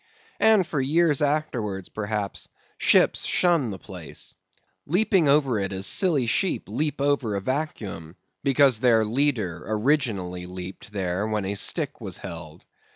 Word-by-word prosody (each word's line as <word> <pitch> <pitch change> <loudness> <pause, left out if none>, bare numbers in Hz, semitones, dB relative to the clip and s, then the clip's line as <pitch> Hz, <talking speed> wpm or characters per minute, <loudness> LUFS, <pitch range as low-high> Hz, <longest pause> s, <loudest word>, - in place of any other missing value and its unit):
_ - - -37 0.4
And 220 -4 +5
for 150 -4 -2
years 150 +2 +2
afterwards, 125 - -1
perhaps, 105 -1 -4 0.3
ships - - +4
shun 170 -9 +2
the 100 - -5
place; 90 -6 -8 0.5
leaping 180 -2 +2
over 140 -6 +3
it 95 0 -2
as 95 0 -2
silly 160 -10 +3
sheep 180 +10 0
leap 150 -1 -2
over 140 -7 +1
a - - 0
vacuum, 100 - -4 0.3
because 135 -4 +4
their 115 -3 +4
leader 110 - 0
originally 105 -7 -1
leaped 90 +2 -9
there 95 0 -2
when 105 -2 -2
a 100 - -2
stick 140 - +1
was 95 -5 -4
held. 85 -4 -9
115 Hz, 145 wpm, -25 LUFS, 95-145 Hz, 0.5 s, And